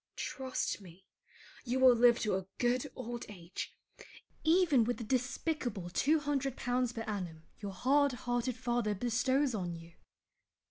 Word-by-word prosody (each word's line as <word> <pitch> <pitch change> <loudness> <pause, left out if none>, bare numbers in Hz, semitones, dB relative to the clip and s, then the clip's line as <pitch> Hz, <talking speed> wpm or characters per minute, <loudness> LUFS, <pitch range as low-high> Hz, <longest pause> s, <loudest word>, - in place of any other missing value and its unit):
Trust 260 -5 -2
me, 185 0 -14 0.6
you 255 +1 -1
will 260 -1 +8
live 240 0 +6
to 215 - +1
a 190 0 -2
good 250 +3 +1
old 240 -1 -5
age, 180 -3 -7 0.7
even 320 -6 +5
with 245 +2 -1
the 235 - -5
despicable 245 - -2
200l. 280 - +1 0.4
per 225 - -3
annum 180 -7 -5 0.2
your 200 -2 -5
hard 275 +8 +3
hearted 245 0 -1
father 240 -4 0
bestows 260 +5 +1
on 180 -5 -2
you. 165 0 -12
240 Hz, 135 wpm, -33 LUFS, 205-260 Hz, 0.7 s, will